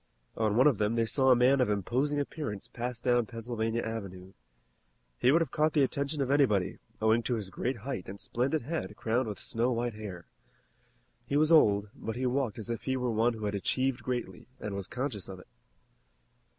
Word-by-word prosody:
On 110 -2 +1
one 130 - +6
of 140 -8 +4
them 105 +2 +1
they 115 -1 +2
saw 130 +3 +2
a 130 - +8
man 130 +2 +4
of 125 - +2
imposing 125 +9 0
appearance 140 -8 -4
pass 120 0 -3
down 120 -2 +2
Pennsylvania 115 0 -2
Avenue. 95 -4 -6 0.9
He 125 - +5
would 165 +3 +4
have 165 - -1
caught 155 +1 +2
the 145 - +4
attention 140 +2 -1
of 135 - -2
anybody, 125 -10 +2 0.2
owing 110 +1 +3
to 120 +1 -1
his 100 -4 -5
great 130 +7 -2
height 130 -11 -4
and 100 +1 -8
splendid 130 +4 -1
head 160 +6 -4
crowned 120 +2 0
with 105 - -5
snow 120 +3 0
white 120 0 -1
hair. 100 -5 -8 1.0
He 140 - +1
was 155 +2 +3
old, 105 -10 +5
but 115 - -5
he 130 +1 -2
walked 125 -3 0
as 115 +1 -4
if 115 - -3
he 130 0 0
were 125 -1 -1
one 115 +2 +2
who 110 -2 -5
had 105 - -1
achieved 130 +6 0
greatly, 125 +1 -4
and 105 - -4
was 100 -1 -4
conscious 125 -8 -4
of 95 -1 -8
it. - - -15
120 Hz, 205 wpm, -30 LUFS, 105-130 Hz, 1.0 s, a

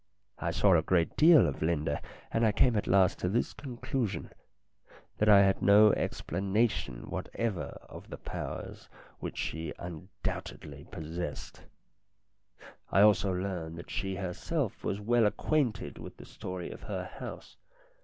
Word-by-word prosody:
I 85 - -1
saw 95 +2 +4
a 80 - +4
great 85 -1 +1
deal 160 - +7
of 70 - -4
Linda, 80 -3 0 0.3
and 115 - +1
I 110 - +5
came 120 +2 +3
at 105 - 0
last 95 -1 +4
to 90 - 0
this 115 +5 0
conclusion, 125 -4 -3 0.9
that 105 - +4
I 100 -1 +8
had 95 0 +2
no 105 +1 +7
explanation 95 - -1
whatever 115 -6 -3
of - - -11
the - - -6
powers - - -6 0.3
which - - -6
she 80 -1 -3
undoubtedly 90 +2 -6
possessed. 80 0 -6 1.2
I 95 - +4
also 105 -2 +5
learned 90 -3 -3
that 85 - -9
she 95 -1 -2
herself 100 - -3
was 100 - -1
well 115 +1 +3
acquainted 125 +2 -1
with - - -9
the - - -11
story 90 -1 -6
of - - -10
her - - -4
house. - - -9
95 Hz, 145 wpm, -30 LUFS, 85-110 Hz, 1.2 s, I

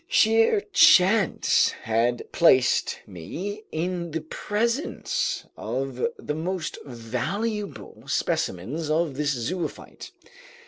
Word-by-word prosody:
Sheer 225 - +4
chance 195 +3 +5
had 115 +2 0
placed 130 -7 +3
me 185 - -6
in 170 +1 -2
the 160 0 -3
presence 230 - -2
of 130 - -2
the - - -4
most 170 +2 -3
valuable 140 - -4
specimens 135 - -2
of 160 -1 +1
this 145 +2 -1
zoophyte. 160 +8 -5
160 Hz, 90 wpm, -25 LUFS, 125-200 Hz, -, chance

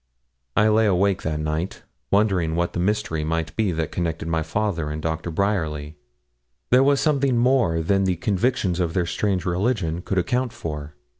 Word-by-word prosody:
I 105 - +5
lay 110 0 +4
awake 95 0 +2
that 80 -1 -2
night, 80 +3 -3 0.3
wondering 95 -6 +2
what 85 +1 0
the - - -2
mystery 95 -4 0
might 80 +1 -2
be 110 -4 +1
that 80 0 -2
connected 80 -2 -2
my 80 -1 0
father 85 -1 -1
and 75 +1 -4
Dr. 80 +1 -3
Bryerly. 80 -5 -1 0.8
There 125 +1 +6
was 140 0 +4
something 140 -5 +2
more 120 -10 +2
than 95 +3 +2
the 95 -1 +1
convictions 100 0 0
of 85 -2 -1
their 90 -2 +2
strange 95 +2 -1
religion 90 -2 0
could 95 - -3
account 125 +5 0
for. 75 -2 -6
90 Hz, 170 wpm, -23 LUFS, 80-105 Hz, 0.8 s, There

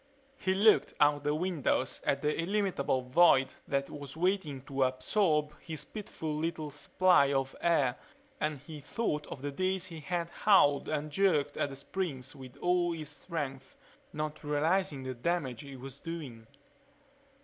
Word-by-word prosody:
He 190 0 +1
looked 210 +3 +4
out 145 -1 +4
the 145 +1 +1
windows 160 -6 0
at 140 - +1
the 150 0 +1
illimitable 180 -9 0
void 135 -1 +5
that 140 0 0
was 145 0 -8
waiting 170 -7 0
to 135 -1 -3
absorb 150 +4 +2
his 160 -3 -5
pitiful 165 -7 -5
little 155 -1 -2
supply 150 0 +3
of 135 -1 -1
air 145 -7 +2 0.4
and 155 -5 -1
he 150 +3 -10
thought 150 -1 -2
of 135 - -8
the 145 - -2
days 185 +4 0
he 165 -3 -6
had 170 +1 -3
hauled 145 -9 +4
and 150 0 -2
jerked 150 -5 +2
at - - 0
the 135 - -7
springs 140 -3 -4
with 130 -2 -11
all 175 -1 +2
his 155 -3 -6
strength, 145 -5 -6 0.3
not 150 0 -4
realizing 150 0 +1
the 130 0 -4
damage 130 -2 -2
he 140 -1 -9
was 130 0 -8
doing. 140 -10 -7
150 Hz, 155 wpm, -31 LUFS, 140-175 Hz, 0.4 s, void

